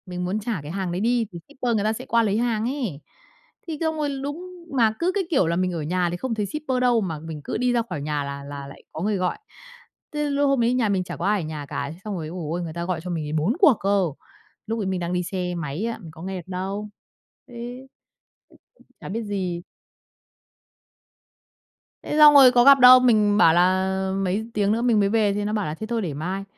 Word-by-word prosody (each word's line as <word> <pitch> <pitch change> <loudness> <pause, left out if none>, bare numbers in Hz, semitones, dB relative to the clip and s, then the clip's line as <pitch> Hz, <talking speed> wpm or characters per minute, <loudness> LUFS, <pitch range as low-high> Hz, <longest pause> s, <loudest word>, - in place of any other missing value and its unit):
Mình 180 -1 -4
muốn 190 +4 -1
trả 215 -5 -3
cái 145 +2 -8
hàng 190 -1 -3
đấy 180 +2 -2
đi 235 +1 +2
thì 170 - -8
shipper 255 -5 -2
người 205 - 0
ta 215 +1 +1
sẽ - - -7
qua 230 0 +2
lấy 205 -1 +1
hàng 230 -2 0
ấy. 240 - -3 0.7
Thì 320 -2 -4
xong 320 -1 0
rồi 300 -1 -1
đúng 300 +6 -5 0.3
mà 225 -3 +4
cứ 350 +2 +1
cái 400 - +1
kiểu 265 - +2
là 170 - 0
mình 185 +1 0
ở 165 - -3
nhà 175 +3 0
thì 175 - -3
không 250 +3 -3
thấy 210 -2 -1
shipper 270 +2 -2
đâu 245 -2 +3
mà 165 -6 -3
mình 160 -1 -8
cứ - - -3
đi 250 +2 +1
ra 240 - +2
khỏi 145 - -4
nhà 145 0 -2
là 140 0 -6
là 140 0 -7
lại 140 - -13
có 160 - -6
người 205 +2 0
gọi. 180 -1 -1 0.8
Thế 295 -1 -1
lúc 285 0 +1
hôm 275 -2 +2
đấy 235 +1 +2
nhà 245 -4 +1
mình 190 -2 +1
chả - - -7
có 175 - -3
ai 205 -1 +2
ở - - -5
nhà 155 -2 -6
cả, 140 0 -3
thế - - -14
xong 210 -2 -4
rồi, 160 -3 -5
ôi 170 +4 -7
giời 160 - -5
ôi, 175 +2 -2
người 165 -2 -6
ta 170 +1 -4
gọi 180 -2 -2
cho 180 - -6
mình 160 -3 -3
ấy 150 - -5
4 160 +8 +1
cuộc 345 -8 +7
cơ, 195 -1 +2 0.6
lúc 225 +1 -2
ấy 205 - -2
mình 190 -1 -1
đang 175 0 -3
đi 180 0 0
xe 180 -1 -3
máy 165 +4 -3
á, 230 - -2
mình 165 - -10
có 160 - -13
nghe 190 0 -4
được 175 - -9
đâu. 195 +3 -4 0.6
Ừ. 245 - -14 1.4
Chả - - -9
biết 225 +4 -3
gì! 185 -4 -3 2.4
Thế - - -3
xong 300 -1 +9
rồi 270 -3 +9
có 245 -1 +5
gặp 275 +1 +8
đâu, 255 0 +10
mình 215 -5 +3
bảo 165 -6 +6
là 190 +2 +2
mấy 195 +4 -1
tiếng 205 -1 +1
nữa 225 +2 +1
mình 235 -3 +3
mới 200 -1 +2
về 210 -2 +2
thì 205 0 -2
nó 210 - -2
bảo 210 -2 -1
là 150 - -3
thế 220 +6 -6
thôi 230 0 -1
để 170 -7 -3
mai, 180 +7 -4
200 Hz, 255 wpm, -24 LUFS, 175-235 Hz, 2.4 s, đâu